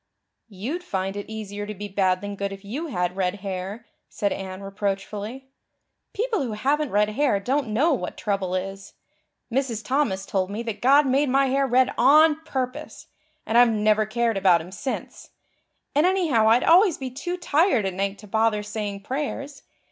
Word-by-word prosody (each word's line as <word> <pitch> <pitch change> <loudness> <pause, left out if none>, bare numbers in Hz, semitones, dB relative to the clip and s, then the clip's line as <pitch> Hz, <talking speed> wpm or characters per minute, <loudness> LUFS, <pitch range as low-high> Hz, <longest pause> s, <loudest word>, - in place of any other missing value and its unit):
"You'd 240 - -5
find 195 - -3
it 205 +1 -6
easier 205 -2 -6
to 210 - -6
be 205 +2 -6
bad 190 -2 +1
than 205 0 -5
good 200 0 -3
if 195 0 -10
you 280 +11 -4
had 180 - -2
red 185 0 0
hair," 195 +3 -5 0.2
said 200 - -1
Anne 190 0 -7
reproachfully. 205 +6 -4 0.6
"People 450 0 0
who 240 -5 -3
haven't 280 +7 0
red 210 0 +2
hair 225 -2 +1
don't 265 +6 -1
know 270 +10 +2
what 195 -9 -4
trouble 195 -3 -1
is. 195 +1 -5 0.6
Mrs. 245 -4 -1
Thomas 255 -9 0
told 190 -2 -1
me 210 +3 -4
that 225 -3 -5
God 280 +4 +5
made 270 +2 +2
my 275 +1 +3
hair 275 +1 +1
red 255 +1 +3
on 305 +4 +5
purpose, 255 -4 -5 0.4
and 230 +2 +3
I've 245 -1 +7
never 215 0 +2
cared 230 -1 0
about 185 -3 +4
Him 170 +3 -9
since. 260 +7 -6 0.6
And 300 +5 +4
anyhow 315 -13 +3
I'd 235 +3 +4
always 355 +1 +5
be 260 -1 -5
too 350 +8 -4
tired 320 - +2
at 190 - -2
night 195 +2 -2
to 210 - -13
bother 220 0 +1
saying 210 -1 -4
prayers. 280 +1 -4
220 Hz, 180 wpm, -24 LUFS, 200-275 Hz, 0.6 s, I've